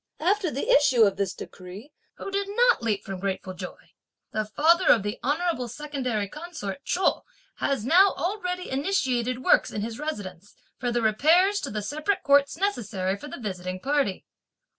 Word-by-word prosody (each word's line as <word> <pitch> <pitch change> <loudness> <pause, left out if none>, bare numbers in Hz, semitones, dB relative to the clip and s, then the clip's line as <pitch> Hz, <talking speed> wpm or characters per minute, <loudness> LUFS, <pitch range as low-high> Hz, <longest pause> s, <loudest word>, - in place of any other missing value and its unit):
After 370 +2 +1
the 280 -1 -4
issue 265 -5 +5
of 200 -2 +2
this 195 -2 0
decree, 190 +10 -10 0.2
who 390 - -7
did 400 0 -1
not 480 - +3
leap 210 -3 -1
from 195 -1 -5
grateful 190 -1 -3
joy! 180 - -9 0.4
The 215 0 -1
father 325 - +3
of 220 - +6
the 205 +2 -4
honourable 300 -2 0
secondary 250 -5 -3
consort 300 - -7
Chou 370 - +1 0.4
has 270 -6 -1
now 370 +8 +6
already 360 +2 -3
initiated 255 -5 0
works, - - +4
in 210 - -4
his 225 +2 -5
residence, 205 - -6 0.2
for 245 -1 -1
the 235 -1 0
repairs 335 - +4
to - - -4
the 210 0 -4
separate 305 - -1
courts 280 +1 +4
necessary 210 - -1
for 200 - -10
the - - -7
visiting 185 -4 -5
party. 275 -6 -1
260 Hz, 165 wpm, -26 LUFS, 205-335 Hz, 0.4 s, of